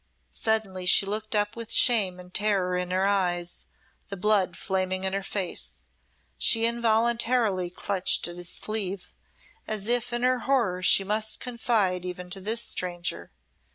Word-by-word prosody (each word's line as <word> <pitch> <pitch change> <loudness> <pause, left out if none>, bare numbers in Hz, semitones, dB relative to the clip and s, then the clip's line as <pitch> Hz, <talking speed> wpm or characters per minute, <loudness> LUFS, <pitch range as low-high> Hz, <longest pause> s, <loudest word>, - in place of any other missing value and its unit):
Suddenly 205 -5 0
she 195 - +6
looked 215 +2 -3
up 210 0 0
with 230 -1 -6
shame 200 -7 +3
and 180 0 -13
terror 195 -3 +1
in 180 0 -2
her 185 +1 +1
eyes, 175 -3 0 0.4
the 200 - -6
blood 190 -3 +1
flaming 185 -1 -2
in 190 0 -1
her 195 - -1
face. 190 -2 -3 0.6
She 225 0 +3
involuntarily 230 -4 +1
clutched 185 0 0
at 175 - -8
his 175 -1 -7
sleeve 200 -3 -4 0.5
as 215 -2 -1
if 240 +1 +1
in 240 0 -1
her 255 0 +2
horror 220 -10 +1
she 190 +1 +4
must 215 +2 0
confide 220 -7 0
even 180 0 -7
to 195 0 -2
this 225 +4 +1
stranger. 175 -1 -2
200 Hz, 155 wpm, -26 LUFS, 180-220 Hz, 0.6 s, she